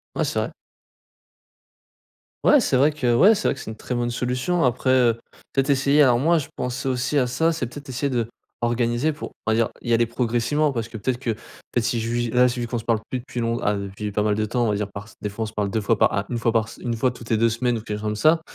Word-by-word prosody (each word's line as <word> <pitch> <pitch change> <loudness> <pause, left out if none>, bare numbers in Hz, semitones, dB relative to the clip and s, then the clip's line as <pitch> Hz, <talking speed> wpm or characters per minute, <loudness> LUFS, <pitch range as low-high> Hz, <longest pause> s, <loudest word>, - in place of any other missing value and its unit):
Ouais - - +1
c'est - - -1
vrai. - - -2 1.9
Ouais, 295 - +6
c'est 135 - +2
vrai 145 +4 +4
que 125 -6 +1
ouais, 205 - +7
c'est 210 - -1
vrai - - +1
que 135 - -11
c'est 110 - -6
une - - -8
très 125 - -4
bonne 120 0 -1
solution. 125 +8 0
Après, 125 +1 +2
heu, 120 -3 +4 0.3
peut-être 135 +1 +2
essayer 140 +2 +4
alors 125 -3 +4
moi 165 +5 +3
je 145 -2 -2
pensais 125 +2 -3
aussi 125 +2 0
à 130 - +4
ça, 160 +7 +1
c'est 160 -6 -2
peut-être 140 +4 -10
essayer 130 +2 -1
de 120 -3 0 0.3
d'organiser 120 +4 +1
pour 150 - -7
on 110 - +1
va - - +3
dire 115 0 +2
y 120 - -3
aller 115 0 +4
progressivement. 120 +5 0
Parce 115 -3 -3
que 115 - -8
peut-être 125 +4 -2
qu'en 115 - +1 0.4
fait, 120 - +2
si 120 0 0
je 115 +1 -2
lui 120 0 0
là 125 +2 +4
vu 120 -1 -1
qu'on 120 - -2
se 115 - -5
parle 115 -2 +2
plus 130 - -2
depuis 125 - -6
long 115 0 0
ah 105 - +2
depuis 100 +1 -5
pas 105 - 0
mal 105 -1 +2
de 110 0 0
temps, 120 +2 0
on - - +1
va 105 - +1
dire 105 0 -2
par 100 +1 -8
se - - -17
des 105 - -3
fois 100 +3 -4
on - - -1
se 110 - -10
parle 105 -2 -1
2 110 - 0
fois 105 +1 +1
par - - +3
ah 100 0 0
1 120 - -2
fois 115 0 +1
par 115 -1 +1
se - - -12
1 120 -1 -2
fois 125 +3 +2
toutes 115 -1 -9
les 110 - +4
2 115 +1 +3
semaines 120 +1 0
ou - - -9
quelque 105 -1 -4
chose 105 - -9
comme 105 0 -1
ça, 155 +9 +4
120 Hz, 290 wpm, -23 LUFS, 115-130 Hz, 1.9 s, ouais